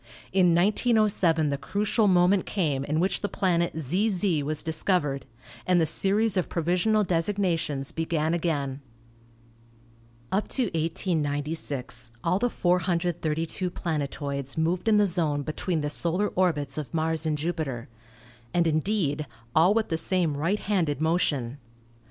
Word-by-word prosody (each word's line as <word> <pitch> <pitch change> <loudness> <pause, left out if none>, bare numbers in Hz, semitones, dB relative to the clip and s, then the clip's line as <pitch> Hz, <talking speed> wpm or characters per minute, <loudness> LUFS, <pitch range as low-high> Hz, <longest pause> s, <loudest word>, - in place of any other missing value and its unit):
In 180 -3 +4
1907 195 -5 +2
the 140 -1 -2
crucial 210 - +1
moment 185 +1 +3
came 150 -9 0
in 150 +2 0
which 185 +3 0
the 205 - -2
planet 170 -3 0
ZZ 180 - +1
was 150 +1 -3
discovered, 160 -4 0 0.4
and 180 -1 +4
the 165 - +3
series 200 +5 +1
of 185 - 0
provisional 180 +6 +1
designations 165 -6 -1
began 160 -1 -1
again. 145 -5 -1 1.5
Up 200 +3 0
to 260 - 0
1896 145 - -2
all 180 +3 +1
the 245 +3 +1
432 175 -2 0
planetoids 140 -4 -3
moved 170 +5 0
in 215 -1 +5
the 210 - +5
zone 160 -6 0
between 155 +2 -2
the 145 - -1
solar 180 +7 0
orbits 155 -6 0
of 150 - -6
Mars 160 0 0
and 155 -1 0
Jupiter; 150 -6 -3 0.7
and, 175 -1 +3
in 155 -1 +2
deed, 155 -7 -1 0.3
all 175 +6 +5
with 225 -1 +1
the 160 - 0
same 170 -2 +1
right 165 +8 0
handed 170 -9 0
motion. 145 -6 0
165 Hz, 135 wpm, -26 LUFS, 150-185 Hz, 1.5 s, in